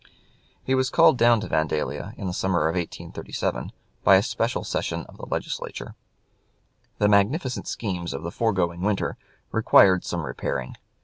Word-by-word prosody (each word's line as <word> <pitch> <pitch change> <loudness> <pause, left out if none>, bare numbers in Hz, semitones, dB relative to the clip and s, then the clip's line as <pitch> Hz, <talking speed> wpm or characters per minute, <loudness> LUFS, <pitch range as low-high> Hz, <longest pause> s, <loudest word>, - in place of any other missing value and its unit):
He 130 - 0
was 130 0 +2
called 125 - +5
down 115 -1 +5
to - - -5
Vandalia 80 -1 -2
in - - -6
the 90 - -2
summer 95 -3 +1
of 80 - 0
1837, 90 -2 -4 0.3
by 95 - +7
a 95 - +4
special 115 +1 -1
session - - -3
of - - -16
the - - -9
Legislature. - - -4 1.0
The 105 - +3
magnificent 120 - +1
schemes 90 -6 -3
of 70 - -5
the 85 - -4
foregoing 90 -6 0
winter 100 0 0 0.4
required 100 -4 +5
some 85 -3 -3
repairing. 65 0 -4
95 Hz, 150 wpm, -25 LUFS, 85-115 Hz, 1.0 s, by